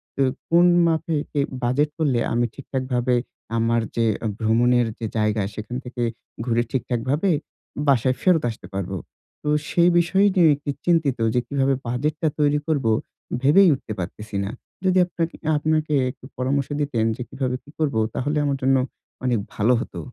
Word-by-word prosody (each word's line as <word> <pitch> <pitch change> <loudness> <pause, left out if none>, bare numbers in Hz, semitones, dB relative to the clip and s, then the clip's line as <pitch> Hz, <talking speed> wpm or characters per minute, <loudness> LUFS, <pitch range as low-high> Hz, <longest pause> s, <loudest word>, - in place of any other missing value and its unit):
তো 135 - +2 0.3
কোন 170 +1 +6 0.2
মাপে 160 0 0 0.2
এ - - +4 0.2
বাজেট 140 +5 +2
করলে 140 -7 +1
আমি 120 +1 +2
ঠিকঠাকভাবে 130 -2 -1 0.4
আমার 115 0 +2
যে 115 -1 +2 0.3
ভ্রমণের 120 +2 +3
যে 115 - -3
জায়গা 105 0 +1
সেখান 110 +3 -6
থেকে 120 -1 -4 0.4
ঘুরে 120 -1 +2
ঠিকঠাকভাবে 130 - 0 0.6
বাসায় 130 -1 +3
ফেরত 180 -6 +3
আসতে 110 -5 -8
পারবো? 95 0 -3 0.5
তো 150 - -1 0.2
সেই 175 0 +4
বিষয় 190 +4 +3
নিয়ে 175 -3 +6
একটু 145 +1 -8 0.2
চিন্তিত 160 -7 +2 0.2
যে 125 - +3
কীভাবে 135 -1 +1
বাজেটটা 150 +6 -1
তৈরি 145 0 +3
করব? 145 -6 0 0.6
ভেবেই 170 +8 +6
উঠতে 125 -5 -5
পারতেছি 105 +4 -6
না। 100 - -3 0.4
যদি 185 0 +3
আপনাকে 170 -1 -3 0.2
আপনাকে 155 0 0 0.2
একটু - - -17
পরামর্শ 135 +2 0
দিতেন 130 -6 0
যে 125 - -8
কীভাবে 130 -2 -2
কী - - -18
করব? 145 -6 0 0.2
তাহলে 145 +3 -1
আমার 140 -1 0
জন্য 135 +1 +3 0.5
অনেক 120 -4 +2
ভালো 110 +4 +3
হতো। - - -6
135 Hz, 155 wpm, -23 LUFS, 120-150 Hz, 0.6 s, কোন